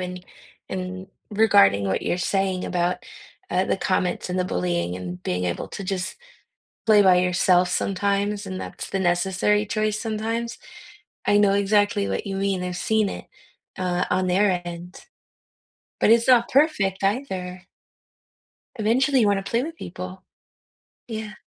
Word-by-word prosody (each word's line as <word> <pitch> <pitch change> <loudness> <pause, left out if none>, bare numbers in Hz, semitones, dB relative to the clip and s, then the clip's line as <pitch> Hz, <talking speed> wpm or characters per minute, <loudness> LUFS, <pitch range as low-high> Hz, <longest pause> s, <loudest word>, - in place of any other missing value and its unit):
and 180 0 -6 0.4
and 185 0 -5 0.2
regarding 100 - +4
what 95 - -1
you're - - 0
saying 190 0 0
about, 180 0 -1 0.5
uh, 185 +1 +2
the - - 0
comments 185 -1 -1
and 185 - -1
the 180 - +1
bullying 90 - -1
and 90 -1 -7
being 90 0 -2
able 85 -1 -2
to 200 - -7
just 190 -1 -3 0.7
play 215 -2 +6
by 185 -2 +6
yourself 180 0 +3
sometimes, 200 +2 -1
and 190 -1 -5
that's - - -7
the 195 - -1
necessary 190 +3 +1
choice 215 0 -1
sometimes, 225 +2 -3 0.7
I 205 - +4
know 200 -1 +4
exactly 200 - +2
what 95 - -3
you 195 -1 -3
mean, 195 -2 -1
I've 180 -1 -4
seen 215 +2 +1
it, - - -7 0.5
uh, 180 -1 0
on 185 0 +1
their 185 0 +2
end, 175 +1 -8 1.0
but - - +4
it's 230 +1 +4
not 240 -2 +5
perfect 255 - +2
either. 190 -5 -2 1.1
Eventually, 255 +5 +2
you 215 - +4
wanna 200 -1 +2
play 230 +5 -1
with 325 +2 -6
people. 185 - -8 0.8
Yeah. 220 -2 -5
190 Hz, 150 wpm, -24 LUFS, 180-210 Hz, 1.1 s, play